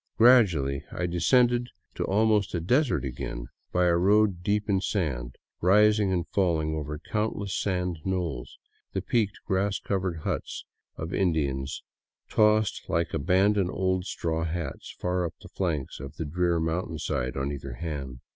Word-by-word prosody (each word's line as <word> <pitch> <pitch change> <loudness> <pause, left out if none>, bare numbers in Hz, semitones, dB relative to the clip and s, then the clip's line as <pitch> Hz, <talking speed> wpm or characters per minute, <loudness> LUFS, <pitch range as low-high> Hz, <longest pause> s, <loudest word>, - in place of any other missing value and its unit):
Gradually 90 - +5
I 90 - -2
descended 120 +8 +3 0.3
to - - -3
al 105 +3 +3
most 105 -3 +2
a - - 0
desert 125 - +2
again, - - -5 0.2
by 90 0 +2
a 85 -1 +4
road 100 0 +3
deep 105 +3 0
in 95 -2 +2
sand, 65 - -2 0.3
rising 105 +2 +4
and 85 -3 0
falling 80 -5 +1
over 75 -1 -4
countless 105 +2 -2
sand 90 -4 -1
knolls, 85 -10 -3 0.4
the - - -2
peaked, 110 -4 0
grass 95 0 +1
covered 95 -4 -2
huts - - -3 0.3
of 80 +3 -5
Indians 70 -7 0 0.5
tossed 110 -1 +2
like 85 +1 0
abandoned 95 +4 +2
old 95 -1 0
straw 80 -4 -2
hats 80 -4 -4
far 90 0 0
up 85 - -4
the - - -13
flanks 80 -8 -2
of 70 +3 -8
the 80 - -4
drear 85 +2 +1
mountain 80 0 -2
sides 65 -5 -2
on 70 +1 -1
either 70 -2 -6
hand. 70 -4 -5
90 Hz, 155 wpm, -27 LUFS, 80-100 Hz, 0.5 s, Gradually